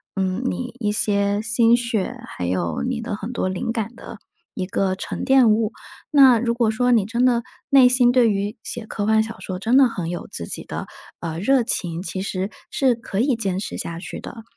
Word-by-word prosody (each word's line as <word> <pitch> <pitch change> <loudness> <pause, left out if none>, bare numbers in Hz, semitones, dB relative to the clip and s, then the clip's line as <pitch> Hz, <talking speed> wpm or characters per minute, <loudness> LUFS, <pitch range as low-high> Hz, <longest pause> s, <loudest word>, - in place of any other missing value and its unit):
嗯， 190 +3 -1
你 245 -1 -5
一 210 -3 0
些 205 -1 +1
心 230 +2 +3
血， 235 -1 -2
还 90 - -5
有 85 -1 -1
你 250 -2 -2
的 225 -2 -3
很 215 +3 -6
多 235 - -1
灵 185 +4 -2
感 230 0 -3
的， 225 - -10 0.4
一 185 - -3
个 190 0 0
沉 - - -5
淀 265 -4 +5
物。 215 0 +1 0.4
那 265 -5 +7
如 235 0 0
果 235 -2 +1
说 245 +3 +1
你 225 -5 +4
真 235 +4 -1
的 240 -2 +3 0.3
内 265 -2 +7
心 250 -1 +4
对 245 -2 +4
于 205 +3 -2
写 235 -2 -5
科 205 -1 -3
幻 220 0 +4
小 225 0 -8
说 185 -1 -5
真 230 +6 +3
的 270 -2 +7
很 175 -7 -4
有 175 - -5
自 85 - -5
己 - - -5
的， - - -6 0.3
呃， 165 -1 -4
热 255 +6 +3
情， 170 -6 -2
其 190 -1 -4
实 190 0 -3 0.2
是 260 -3 +2
可 225 -4 -5
以 260 -1 +2
坚 195 -4 -2
持 - - -5
下 165 0 -4
去 - - -7
的。 225 - -9
220 Hz, 230 characters per minute, -22 LUFS, 195-245 Hz, 0.4 s, 那